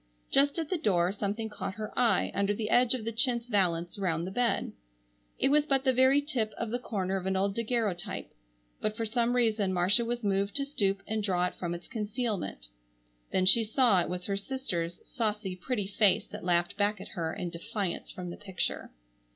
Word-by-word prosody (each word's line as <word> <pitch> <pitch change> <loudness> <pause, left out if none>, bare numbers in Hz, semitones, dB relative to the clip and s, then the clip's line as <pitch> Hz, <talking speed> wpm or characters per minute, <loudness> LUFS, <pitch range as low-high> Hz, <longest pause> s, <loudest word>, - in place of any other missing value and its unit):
Just 280 +2 +3
at 325 -2 -2
the 365 - 0
door 180 - +2
something 210 +2 -3
caught 210 -3 -5
her 215 -1 -6
eye 240 - +3
under 200 +2 +1
the 215 0 -3
edge 245 0 +4
of 230 -4 -6
the 230 - -1
chintz 235 0 +1
valence 175 -5 +1
round 170 -3 0
the 185 - -5
bed. 240 +3 0 0.7
It - - +2
was 300 +1 +3
but 270 -2 +2
the 260 -2 +3
very 260 +3 +5
tip 240 -7 -1
of 230 -2 -4
the 245 - -1
corner 195 -5 -2
of 190 0 -4
an 190 - 0
old 195 +1 +1
daguerreotype, 225 -5 -2 0.5
but 215 0 -2
for 225 - -1
some 235 +2 +1
reason 220 -5 +2
Marcia 185 +6 +3
was 240 0 -3
moved 200 0 0
to 280 - +1
stoop 200 -8 0
and 220 0 -2
draw 180 -3 +1
it - - -3
from 175 -1 -3
its 170 - -10
concealment. 210 - -3 0.6
Then 185 - +2
she 225 +5 +7
saw 220 -3 +4
it - - -3
was 180 0 -4
her 200 -1 -1
sister's 195 -8 -3
saucy, 210 -5 -2
pretty 205 +3 -2
face 200 0 +3
that - - -8
laughed 175 +1 +1
back 210 0 +1
at - - -9
her 165 -2 -3
in 175 -2 -4
defiance 195 +1 -3
from 180 -1 -6
the - - -8
picture. 190 -3 -3
210 Hz, 205 wpm, -29 LUFS, 185-240 Hz, 0.7 s, she